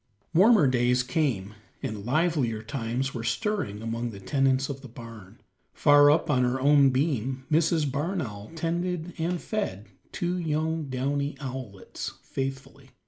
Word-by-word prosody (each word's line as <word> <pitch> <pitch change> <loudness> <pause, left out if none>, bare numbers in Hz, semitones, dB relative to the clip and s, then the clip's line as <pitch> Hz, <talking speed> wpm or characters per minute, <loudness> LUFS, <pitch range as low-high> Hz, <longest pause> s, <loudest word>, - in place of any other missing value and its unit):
Warmer 195 0 +6
days 125 -1 +2
came, 125 - -1 0.3
and 105 -2 -4
livelier 135 -7 +1
times 125 +2 -3
were 115 - -4
stirring 200 - -2
among 115 +1 -2
the 100 -3 -9
tenants 135 +4 +1
of 135 -1 -6
the 135 - -9
barn. 115 -2 -12 0.4
Far 145 -1 +6
up 150 +2 +3
on 130 -4 +2
her 125 +1 +1
own 140 0 +5
beam 130 -2 -1
Mrs. 155 -2 +2
Barn 165 +8 -1
Owl 105 -8 -6
tended 170 +1 -2
and 170 +2 -1
fed 160 - -3 0.3
two 180 +1 -2
young 160 -1 -1
downy 140 +2 -2
owlets 130 -8 -6
faithfully. 135 0 -5
135 Hz, 140 wpm, -27 LUFS, 120-160 Hz, 0.4 s, Warmer